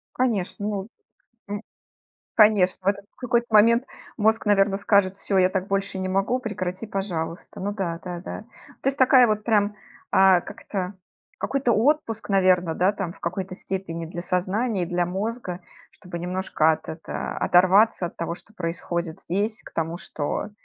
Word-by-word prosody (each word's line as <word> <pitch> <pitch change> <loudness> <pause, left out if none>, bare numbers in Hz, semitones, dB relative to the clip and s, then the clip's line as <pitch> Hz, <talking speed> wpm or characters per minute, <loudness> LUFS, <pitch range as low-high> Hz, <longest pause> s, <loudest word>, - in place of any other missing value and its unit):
Конечно, 205 -5 -1
о 200 -1 -3 0.6
м 205 +1 -4 0.7
конечно, 200 -4 +4
в - - +5
этот 200 0 0
в - - -46
какой-то 240 -1 0
момент 230 +3 +6 0.3
мозг, 220 0 +2
наверно, 195 -1 +4
скажет: 200 -1 +2
"Всё, 195 -1 0
я 185 0 +5
так 190 0 -2
больше 195 -1 -1
не 185 - -2
могу, 195 +7 +1
прекрати, 205 -3 -4
пожалуйста". 175 -6 -4
Ну 205 +2 -2
да, 170 -5 -2
да, 175 -1 -5
да. - - -6 0.4
То 270 - 0
есть 275 - -1
такая 255 -1 +7
вот 215 -1 -1
прям, 210 -2 +2 0.4
а, 190 -2 +6
как - - -11
это? 190 -1 -4 0.4
Какой-то 270 -3 0
отпуск, 230 -1 +1
наверно, 185 -4 +3
да, 185 +3 +3
там, 195 -4 -4
в - - -19
какой-то 185 +2 -4
степени 170 -4 -4
для 175 +1 -6
сознания 190 +3 0
и - - -7
для 175 0 0
мозга, 190 -1 -3 0.3
чтобы 175 -2 -8
немножко 180 -3 +1
от 155 - -3
это 160 +1 -5
оторваться 185 +2 +4
от - - -10
того, 170 0 -3
что 215 - -16
происходит 170 -1 -3
здесь, 205 +5 -1
к - - -12
тому, 165 +1 -2
что, 160 +4 -4
195 Hz, 170 wpm, -24 LUFS, 180-215 Hz, 0.7 s, такая